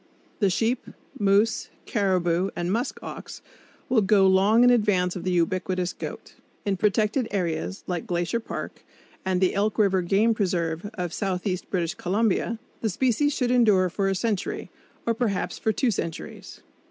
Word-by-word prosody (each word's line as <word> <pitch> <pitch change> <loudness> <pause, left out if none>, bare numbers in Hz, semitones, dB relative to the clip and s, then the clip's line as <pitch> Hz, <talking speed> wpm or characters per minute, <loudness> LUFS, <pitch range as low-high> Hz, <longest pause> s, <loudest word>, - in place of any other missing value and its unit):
The 200 -4 +3
sheep, 230 +6 0 0.3
moose, 205 +2 +2 0.2
caribou 185 -3 +1
and 175 +1 -2
musk 235 +6 -1
ox - - -8 0.4
will 245 -3 +3
go 195 0 +4
long 195 +5 +5
in 245 - +7
advance 205 -6 +2
of 180 - -5
the 185 - -1
ubiquitous 180 +1 0
goat. - - -8 0.3
In 200 -1 +1
protected 210 +5 +1
areas 160 - -2
like 180 +5 -3
Glacier 175 +4 0
Park 230 - -7 0.4
and 185 -1 0
the 185 -1 +2
Elk 205 +2 0
River 195 -4 +3
Game 200 +6 +3
Preserve 175 -3 -1
of 180 -3 -3
southeast 185 -2 -2
British 170 -4 -1
Columbia, 220 +4 0 0.2
the 220 - 0
species 260 +7 +1
should 250 -2 0
endure 210 -7 +4
for 195 +2 0
a 195 - +1
century, 210 -1 -2 0.3
or 230 - +2
perhaps 220 -5 -2
for 220 - +1
two 240 +3 +1
centuries. 165 -5 -6
195 Hz, 155 wpm, -25 LUFS, 180-220 Hz, 0.4 s, in